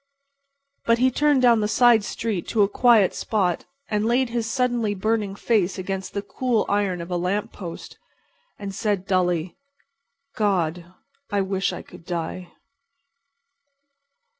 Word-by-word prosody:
But 230 0 +4
he 255 +2 +3
turned 290 0 +2
down 235 -2 +6
the 210 - +1
side 235 0 +5
street 215 -4 -3
to 215 -3 +3
a - - +3
quiet 220 -2 +4
spot 185 -6 -1 0.2
and 210 -1 0
laid 240 +3 +2
his 230 -1 -2
suddenly 240 -4 0
burning 210 0 -1
face 205 -4 +1
against 190 +1 -5
the 200 - -2
cool 240 +1 0
iron 200 -3 0
of 170 +2 -8
a 175 - 0
lamp 185 +4 -1
post, 170 -4 -9 0.6
and 200 -1 -6
said 200 -1 -1
dully: 180 -3 0 0.8
"God! 175 -4 0 0.4
I 200 -1 +1
wish 195 0 -1
I - - -7
could - - -14
die." 175 +1 -5
205 Hz, 140 wpm, -23 LUFS, 185-230 Hz, 0.8 s, down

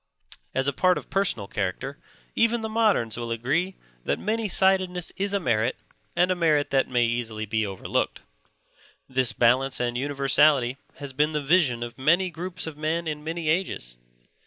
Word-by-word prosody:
As 130 +1 +1
a 140 - +1
part 180 +6 +3
of - - -9
personal 190 - 0
character, 105 +10 -3 0.4
even 230 0 +2
the 220 - -3
moderns 210 - +2
will 120 -1 -4
agree 145 +12 -1 0.3
that - - 0
many 220 +1 -1
sidedness 185 -2 +2
is 200 +2 -1
a 200 - +1
merit 120 - +1 0.4
and 180 +1 +3
a - - +2
merit 155 -4 +2
that 135 -1 +2
may 120 -1 +2
easily 115 -2 -2
be 110 0 -1
overlooked. 95 -2 -2 0.9
This 130 -2 +1
balance 130 +3 +2
and 120 -1 -1
universality 135 -1 +3 0.2
has 140 -2 -8
been 150 +3 +1
the 150 -1 -1
vision 140 -7 +2
of 120 +2 -8
many 170 +7 +3
groups 180 +2 -5
of 160 -2 -7
men 160 +2 -1
in 150 -1 -4
many 165 +1 -4
ages. 155 - -1
145 Hz, 170 wpm, -25 LUFS, 120-180 Hz, 0.9 s, part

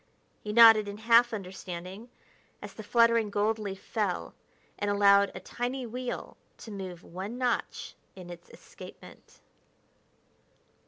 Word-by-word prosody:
He 210 - -5
nodded 225 -2 +7
in 205 0 -6
half 230 +2 +4
understanding 190 +1 -7 0.5
as - - -10
the - - -9
fluttering 230 0 +3
gold 210 +2 0
leaf 195 -2 -5
fell 205 -4 -3 0.5
and 205 - -1
allowed 200 -1 +4
a - - -5
tiny 245 +6 -4
wheel 250 +2 -6 0.2
to 225 - -11
move 185 -3 -7
one 195 +7 -7
notch 250 -2 -2 0.2
in 180 -2 -10
its 175 0 -12
escapement. - - -14
210 Hz, 125 wpm, -29 LUFS, 195-230 Hz, 0.5 s, nodded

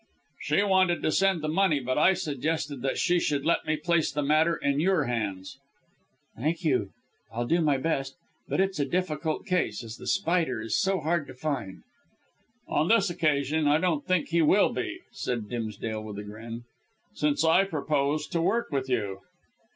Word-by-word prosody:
"She 200 - +1
wanted 185 -3 +2
to - - +2
send 190 -2 +2
the - - -1
money, 165 -2 +2
but 130 0 -2
I 185 +5 +5
suggested 150 -2 -2
that 135 +1 -1
she 175 -1 +2
should 145 -4 -1
let 170 - +1
me 155 - +1
place 170 0 +1
the 150 - -2
matter 155 +3 +3
in 140 -2 0
your 180 -1 +2
hands." 110 -3 -4 0.8
"Thank 160 +8 -2
you. 130 -9 +1 0.4
I'll 120 +1 -2
do 170 +7 +2
my 150 -3 +2
best. 135 -2 -2 0.3
But - - -1
it's 190 -3 -1
a 145 - +2
difficult 160 -3 -2
case, 180 - -1
as 115 0 -8
The - - -10
Spider 170 - +1
is 110 0 -2
so 195 0 +1
hard 160 -1 0
to 130 - -10
find." 130 -8 -4 0.8
"On 155 - +1
this 205 -4 +3
occasion 150 -1 +1
I 145 +1 +5
don't 165 -4 0
think 185 -3 0
he 170 +1 +2
will 155 - +4
be," - - -4
said 120 -4 -3
Dimsdale 110 -1 -4
with 110 -1 -7
grim 105 +1 -6 0.3
humour, 115 +1 -6 0.5
"since 150 +1 +1
I 165 +4 +5
propose 150 -3 -1
to 170 - -1
work 230 +7 0
with 135 -2 -2
you." 100 -6 -1
150 Hz, 180 wpm, -27 LUFS, 130-170 Hz, 0.8 s, I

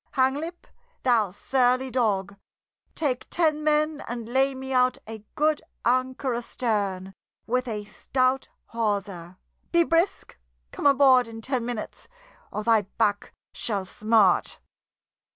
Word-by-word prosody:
Hanglip, 290 +6 0 0.4
thou 230 -6 +3
surly 255 +5 +1
dog! 200 -6 0 0.6
Take 270 -6 -2
ten 310 -3 +1
men 305 0 +1
and 235 -2 -5
lay 265 +2 +1
me 265 0 -5
out 255 0 +3
a 220 -1 -8
good 305 0 +2 0.2
anchor 255 +1 +1
astern, 205 -6 -2 0.3
with 250 +2 -1
a 210 -3 -3
stout 255 +5 -1 0.2
hawser. 200 -6 -2 0.3
Be 340 0 +5
brisk! 330 - 0 0.3
Come - - 0
aboard 265 -3 +5
in 225 0 -9
ten 245 0 -2
minutes, 240 -3 -6 0.4
or 210 - -4
thy 225 -1 +4 0.2
back 205 -1 0 0.2
shall 200 -4 -1
smart." 215 -1 +2
250 Hz, 120 wpm, -25 LUFS, 215-270 Hz, 0.6 s, Be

